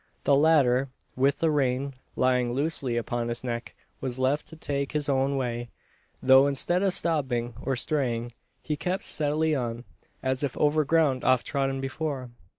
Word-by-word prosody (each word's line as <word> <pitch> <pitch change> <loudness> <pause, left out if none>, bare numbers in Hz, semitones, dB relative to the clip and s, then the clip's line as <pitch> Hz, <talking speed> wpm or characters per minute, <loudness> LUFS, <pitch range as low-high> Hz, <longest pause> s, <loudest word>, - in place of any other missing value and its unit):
The 140 - +4
latter, 140 -4 +4 0.3
with 135 +2 +1
the 165 -1 +3
rein 135 -1 0 0.2
lying 125 -1 +2
loosely 135 -3 -1
upon 120 0 -2
his 120 +1 -4
neck, 120 -1 -4 0.3
was 130 -2 -3
left 130 +3 0
to 160 - -8
take 140 -2 -3
his 150 -1 0
own 135 0 +1
way; 120 -2 -3 0.5
though 130 +1 +7
instead 160 +6 +1
of 195 -2 +2
stopping, 130 -9 0
or 135 - -1
straying, 120 -3 -1 0.3
he 150 - -2
kept 180 +6 -2
steadily 155 +1 +1
on, 120 -4 -2 0.4
as 130 0 0
if 140 -4 -2
over 150 +1 +3
ground 150 -4 +2
oft 130 -2 +3
trodden 135 -2 -1
before. 135 -2 -4
135 Hz, 160 wpm, -27 LUFS, 125-150 Hz, 0.5 s, though